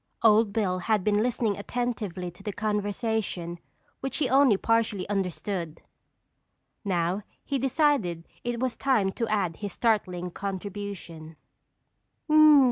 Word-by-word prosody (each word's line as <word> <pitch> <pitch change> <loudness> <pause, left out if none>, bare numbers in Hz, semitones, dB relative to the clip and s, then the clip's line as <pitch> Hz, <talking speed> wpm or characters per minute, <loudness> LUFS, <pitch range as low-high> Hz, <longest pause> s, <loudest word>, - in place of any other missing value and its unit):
Old 220 -1 +5
Bill 195 -4 0
had 210 +1 +1
been 210 +1 +2
listening 230 -3 0
attentively 205 -6 -3
to 175 - -17
the 210 - -3
conversation 205 -4 -2 0.4
which 270 -1 -3
he 295 - +1
only 260 -4 +5
partially 225 -3 +1
understood. 180 -3 -3 1.0
Now 180 0 0 0.2
he 275 -2 -1
decided 255 - +1 0.2
it 240 -1 -2
was 255 -2 -1
time 225 -8 +2
to 230 +3 -2
add 195 -6 0
his 205 -3 -5
startling 185 -6 0
contribution. 195 -4 -6
205 Hz, 120 wpm, -27 LUFS, 180-230 Hz, 1.0 s, Old